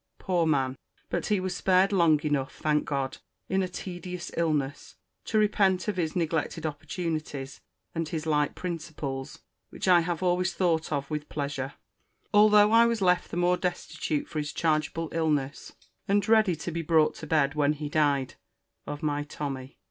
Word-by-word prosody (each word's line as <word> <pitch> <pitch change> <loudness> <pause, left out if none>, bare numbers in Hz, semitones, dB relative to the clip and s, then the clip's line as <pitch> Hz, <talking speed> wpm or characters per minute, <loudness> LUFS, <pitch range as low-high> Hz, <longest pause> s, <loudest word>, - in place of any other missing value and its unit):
Poor 175 -4 0
man!—but 135 -3 -2
he 210 -2 +2
was 185 -1 -3
spared 190 +1 +3
long 165 -5 +4
enough, 145 -3 -1
thank 150 -1 +1
God, 135 -2 -2 0.3
in 190 +1 +1
a 185 - 0
tedious 180 0 -6
illness, 145 -4 -1 0.3
to 220 - 0
repent 205 -3 +2
of 205 -3 -1
his 160 -3 -1
neglected 165 -1 -1
opportunities, 155 -3 -4 0.3
and 165 -2 -2
his 160 -3 -3
light 150 -2 +1
principles; 155 -6 -5 0.3
which - - -5
I 180 -2 +7
have 170 +1 -2
always 180 +1 +1
thought 165 -4 +1
of 140 0 -2
with 150 0 -3
pleasure, 140 -2 -3 0.6
although 210 0 +6
I 230 +1 +6
was 230 -3 0
left 180 -1 +2
the - - -5
more 175 0 +3
destitute 175 -4 -2
for 155 - -4
his 150 0 -3
chargeable 160 0 0
illness, 150 -4 -1 0.3
and 200 0 +2
ready 220 -5 +4
to 165 +2 -5
be 170 +1 -2
brought 160 -1 +3
to 160 - -8
bed, 150 -3 +2
when 150 -1 +2
he 150 0 -5
died, 145 -3 +1 0.5
of 145 +1 -5
my 145 -1 0
Tommy. 140 -3 -6
160 Hz, 165 wpm, -28 LUFS, 145-180 Hz, 0.6 s, I